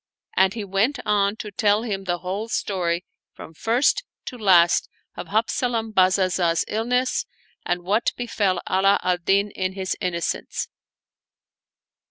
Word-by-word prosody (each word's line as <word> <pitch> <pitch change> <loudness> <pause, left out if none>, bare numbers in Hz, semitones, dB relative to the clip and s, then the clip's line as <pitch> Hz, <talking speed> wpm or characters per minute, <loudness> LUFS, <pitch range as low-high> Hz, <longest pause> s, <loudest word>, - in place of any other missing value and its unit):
And 190 +2 +3
he 220 - -4
went 200 +8 +1
on 205 -1 +2
to 210 -1 -7
tell 205 +2 +2
him 195 -4 -3
the 175 -1 0
whole 195 +5 -4
story 180 -5 -1 0.3
from 160 - -11
first 235 - +1 0.2
to 255 - -6
last 185 -7 +4 0.3
of - - -7
Habzalam 225 +1 -1
Bazazah's 185 -3 +2
illness 250 +4 0 0.4
and 175 0 -1
what 205 +6 +1
befell 205 -6 0
Ala 195 +2 +3
al 180 -1 +2
Din 200 +3 +1
in 185 -1 -2
his 190 -1 -3
innocence. 175 -3 -2
195 Hz, 135 wpm, -23 LUFS, 185-220 Hz, 0.4 s, last